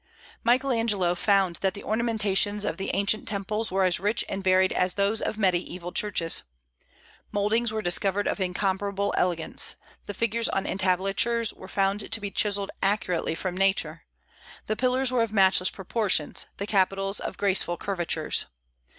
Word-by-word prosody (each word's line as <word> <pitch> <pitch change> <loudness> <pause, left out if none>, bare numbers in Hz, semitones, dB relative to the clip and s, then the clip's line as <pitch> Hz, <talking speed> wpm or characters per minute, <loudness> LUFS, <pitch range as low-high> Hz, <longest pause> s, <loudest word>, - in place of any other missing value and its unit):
Michael 255 +3 +2
Angelo 210 -7 +1
found 190 -1 +2
that 190 -1 -1
the 200 - -9
ornamentations 210 -2 0
of - - -2
the 195 - -4
ancient 200 +2 0
temples 210 +2 -2
were 190 0 +1
as 180 -2 +2
rich 210 +5 +1
and 195 - -4
varied 185 0 +3
as 180 0 0
those 200 +2 +1
of 215 - -2
Mediaeval 180 -3 -1
churches. 180 -6 +1 0.9
Mouldings 215 +3 +1
were 220 0 -3
discovered 195 +3 +2
of - - -1
incomparable 195 +2 -1
elegance; 175 -3 +1 0.3
the 205 - -6
figures 230 +1 +1
on 195 - -1
entablatures 195 +5 +1
were 190 - -12
found 195 +2 0
to 225 - +1
be 205 -1 -5
chiselled 200 -1 +1
accurately 195 -5 0
from 180 +1 -4
nature; 195 +1 0 0.6
the 215 - -1
pillars 255 +2 +1
were 250 -2 +2
of 230 -2 -1
matchless 190 -3 +3
proportions, 190 -5 -1
the 200 - -3
capitals 195 0 +1
of - - -6
graceful 190 -3 +1
curvatures. 175 -4 -1
200 Hz, 155 wpm, -26 LUFS, 190-215 Hz, 0.9 s, varied